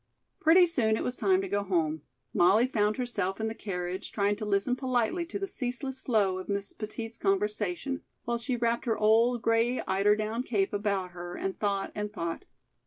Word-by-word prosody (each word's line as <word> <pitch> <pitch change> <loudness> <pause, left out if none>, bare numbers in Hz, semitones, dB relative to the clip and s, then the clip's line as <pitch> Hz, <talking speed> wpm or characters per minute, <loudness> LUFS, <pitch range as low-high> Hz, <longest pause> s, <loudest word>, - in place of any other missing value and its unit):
Pretty 350 +3 +6
soon 230 -10 +2
it - - -2
was 250 - -1
time 190 -5 +2
to 195 - -4
go 205 +2 0
home. 160 -5 0 0.3
Molly 200 +7 +5
found 215 -4 +1
herself 205 -7 -1
in 220 0 -1
the - - -4
carriage, 185 -3 -4
trying 205 0 +1
to 215 - -4
listen 200 +4 +1
politely 260 +7 0
to 345 - -4
the 395 0 -3
ceaseless 260 -3 -4
flow 205 -7 +1
of 185 - -8
Miss 200 0 -2
Petit's 225 +1 -6
conversation, 210 +5 0 0.2
while 235 0 -1
she 250 +2 -1
wrapped 235 +1 0
her 225 -2 +1
old, 225 +2 +3
gray 230 +3 +2
eider 200 +2 +3
down 215 +2 -2
cape 205 -6 0
about 200 -3 -1
her 175 0 -7
and 195 -1 -4
thought 200 -2 -1
and 210 0 -3
thought. 170 -5 -4
215 Hz, 190 wpm, -29 LUFS, 195-240 Hz, 0.3 s, Pretty